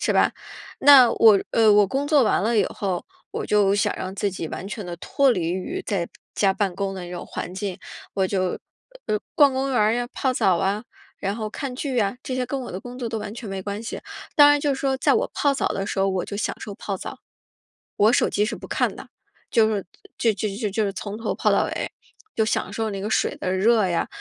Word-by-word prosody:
是 - - +1
吧？ - - +3 0.5
那 260 -5 +8
我 215 -3 +6
呃， 220 -2 +5
我 205 -1 +5
工 280 +7 -2
作 290 -6 +5
完 195 - +2
了 225 0 +2
以 195 - +4
后， 190 -3 -3 0.3
我 - - -4
就 205 -2 +3
想 205 - +1
让 185 0 -5
自 200 0 -1
己 165 -4 -5
完 190 - -6
全 210 0 -6
地 175 -1 -5
脱 275 +9 +2
离 175 -6 0
于 185 0 -3
在 180 -5 -1 0.3
家 195 -2 +3
办 195 -4 -1
公 195 -1 -2
的 185 -2 -6
那 175 - -9
种 180 - -6
环 180 - -6
境。 190 -2 -4 0.4
我 190 -1 +1
就， 185 -2 -1 0.5
呃， 210 - +1 0.2
逛 285 -3 +6
公 270 +1 -1
园 250 - +1
儿 215 +1 +4
呀， 240 0 -1
泡 260 - 0
澡 185 -6 +3
啊， 195 +4 0 0.4
然 200 +2 -2
后 215 -2 -3
看 265 +1 -5
剧 270 -2 -3
呀， 205 0 +1
这 255 - -4
些 255 - -1
跟 275 - -3
我 - - -7
的 185 - -5
工 245 +1 -9
作 240 -2 -3
都 225 -1 -3
完 210 -1 -6
全 235 -3 -7
没 195 0 -4
关 205 +2 -4
系。 230 - -5 0.3
当 290 -1 +8
然 290 - +4
就 285 -1 +1
是 - - -7
说 270 -1 +1
在 - - +2
我 465 +3 0
泡 285 -1 +2
澡 - - 0
的 195 0 -3
时 195 - -3
候 195 0 +3
我 190 -2 -1
就 200 - -7
享 215 - -2
受 205 -3 -7
泡 195 -1 -4
澡， - - -8 0.8
我 215 +3 +5
手 - - +3
机 210 +1 +1
是 220 - -3
不 - - -10
看 - - 0
的， - - -10 0.4
就 220 -1 +5
是 205 -3 -2 0.3
就 230 - +3
就 205 +2 -2
就 215 -1 -2
就 210 +2 0
是 195 - -2
从 205 +2 -6
头 230 - -2
泡 - - +2
到 - - +3
尾， - - -4 0.4
就 220 - +2
享 205 - -1
受 220 0 -1
那 195 -1 -4
个 210 - -3
水 - - +1
的 185 - -2
热 215 +3 +3
呀。 170 -1 0
210 Hz, 270 characters per minute, -23 LUFS, 195-240 Hz, 0.8 s, 那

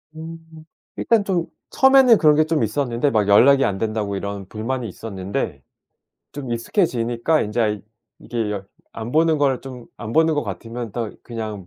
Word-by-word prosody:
음 160 +1 -8 0.6
일단 225 -2 +2
좀 180 -4 0 0.3
처음에는 265 -3 +6
그런 150 -4 +5
게 155 +1 +3
좀 155 -5 0
있었는데 120 +4 0
막 105 -2 +1
연락이 135 +7 +6
안 95 - -1
된다고 110 -2 -2
이런 100 -1 -5
불만이 115 +4 -4
있었는데 95 - -5 0.7
좀 135 -4 -5
익숙해지니까 120 - 0
인제 105 +3 -2
아 105 -2 +1 0.4
이게 115 -3 -3
열 100 -1 -5 0.3
안 115 +1 -5
보는 160 +2 +3
걸 135 -3 +1
좀 125 -3 -10
안 110 0 -7
보는 160 0 +3
것 145 - -1
같으면 115 +3 -6
또 115 -3 -3
그냥 110 -5 -6
120 Hz, 315 characters per minute, -21 LUFS, 105-150 Hz, 0.7 s, 처음에는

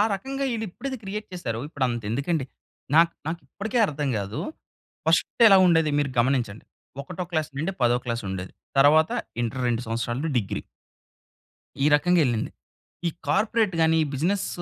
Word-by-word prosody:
రకంగా 270 +7 -4
ఈళ్ళు 225 -1 -2
ఎప్పుడిది 270 +8 -5
క్రియేట్ 210 +2 -5
చేసారో 115 -11 -3
ఇప్పుడు 140 -4 -2
అంత 120 -1 -3
ఎందుకండి. 140 +5 0 0.5
నాకు 165 +1 +6
నాకు 165 +2 -3
ఇప్పటికి 220 +4 -3
అర్థం 145 -4 -2
కాదు. 100 +2 -4 0.7
1స్ట్ - - +2
ఎలా 195 -2 +8
ఉండేది 160 -3 +4
మీరు 145 -2 0
గమనించండి. 120 -4 +1 0.4
ఒకటో 180 +5 -5
క్లాస్ 155 -2 0
నుండి 160 +7 -1
10 120 0 +4
క్లాస్ 115 -1 -2
ఉండేది. 95 0 -5 0.3
తర్వాత 155 +3 +6 0.3
ఇంటర్ 120 +2 -2
2 120 -1 0
సంవత్సరాలు 120 +6 -2
డిగ్రీ. 100 -4 -3 1.2
ఈ - - +5
రకంగెళ్లింది. 150 -8 +2 0.6
ఈ - - +2 0.2
కార్పొరేట్ 215 +5 +2
గాని, 160 0 +4
బిజినెస్ 180 +8 0
155 Hz, 145 wpm, -25 LUFS, 120-180 Hz, 1.2 s, ఎలా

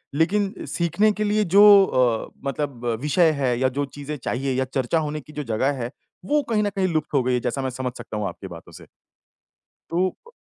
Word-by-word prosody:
लेकिन 195 +6 +1
सीखने 190 +5 +1
के 210 0 -2
लिए 210 +1 +2
जो 200 - +9 0.2
अ, 120 -8 0 0.2
मतलब 135 -3 -4 0.2
विषय 160 +4 +3
है 125 -3 +1
या 130 - +3
जो 145 - +1
चीज़ें 145 +2 -7
चाहिए 130 +1 -2
या 130 +1 0
चर्चा 130 +4 -1
होने 150 +1 -4
की 150 - -16
जो 150 - -4
जगह 120 +3 0
है, 120 - -5 0.3
वो 295 +7 +2
कहीं 215 -2 +2
न 205 - +1
कहीं 195 -1 -1
लुप्त 155 -1 -2
हो 135 -3 +3
गई 125 +1 0
है 125 - +2
जैसा 135 - -2
मैं 130 - -2
समझ 130 0 -4
सकता 110 -2 -7
हूँ 105 -1 -2
आपकी 95 - -8
बातों 85 -2 -11
से। - - -13 1.1
तो 180 +3 +1 0.2
प 470 - -15
145 Hz, 220 wpm, -23 LUFS, 125-180 Hz, 1.1 s, जो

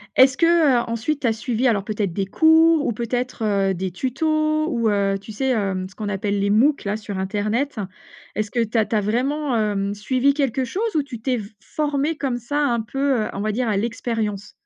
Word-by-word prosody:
Est-ce 260 0 +6
qu'ensuite 290 -5 +2
tu 255 - +1
as 225 - +2
suivi 240 +2 -1
alors 210 -5 +2
peut-être 210 -3 -2
des 195 +3 -2
cours 320 +7 +4
ou - - +1
peut-être, 240 +1 -3 0.3
heu, - - +1
des 185 +1 -3
tutos 310 - 0
ou 230 -3 +1
heu, 200 -1 +1
tu 220 - -10
sais? 265 +5 -1
Hem, 195 -6 -1
ce 190 - -17
qu'on 210 -2 -4
appelle 200 0 -1
les 200 +1 +1
moocs 265 +8 +3
là 205 +1 -1
sur 205 -3 -6
internet? 215 +8 -1 0.6
Est-ce 215 0 -2
que 235 +1 +1
tu 225 +1 -8
as 215 - +3
tu - - -1
as 210 - +3
vraiment, 260 +6 0
hem, 205 -2 0
suivi 255 +7 +1
quelque 270 -2 0
chose 415 - -3
ou 300 - +2
tu 250 -5 -9
t'es 255 +1 0
f 205 -3 -7
formé 295 +3 -1
comme 265 -5 -1
ça 285 +5 -2
un 235 -4 +1
peu, 270 +2 0
heu, - - -8
on 200 - -4
va 215 +1 0
dire 240 +3 -1
à 205 - +1
l'expérience? 220 -2 -3
235 Hz, 215 wpm, -22 LUFS, 210-275 Hz, 0.6 s, Est-ce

